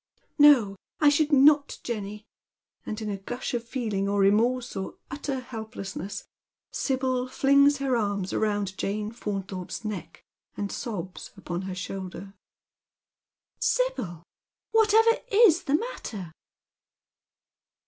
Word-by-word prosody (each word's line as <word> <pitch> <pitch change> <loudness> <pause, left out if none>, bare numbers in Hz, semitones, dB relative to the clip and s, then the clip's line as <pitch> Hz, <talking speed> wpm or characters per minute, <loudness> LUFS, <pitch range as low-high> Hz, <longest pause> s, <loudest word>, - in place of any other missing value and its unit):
" - - -44
No, 215 -9 +3 0.2
I 295 - +6
should 295 +1 +2
not, 285 +1 +5
Jenny; 210 -2 -5 0.3
" - - -50
and, 215 - -3
in 215 - -3
a 200 - -3
gush 245 +8 -5
of 240 -1 -1
feeling 220 -5 -2
or 200 0 +1
re 195 0 +6
morse, 240 +3 +1
or 190 -1 -4 0.2
utter 275 -2 -3
helplessness, 220 -5 -6 0.5
Sibyl 260 -2 0
flings 280 +2 +4
her 270 -2 0
arms 200 -4 -1
round 205 -3 0
Jane 210 +1 -2
Faunthorpe's 195 -3 -5
neck, 205 -6 -6 0.3
and 200 -1 -3
sobs 190 -6 -5
upon 175 -2 -4
her 185 - -4
shoulder. 190 +1 -6 0.6
" - - -60
Sibyl, 205 - 0 0.7
whatever 450 +2 +5
is 405 -6 +5
the 280 - +2
matter 225 - -4
220 Hz, 130 wpm, -27 LUFS, 195-275 Hz, 0.7 s, I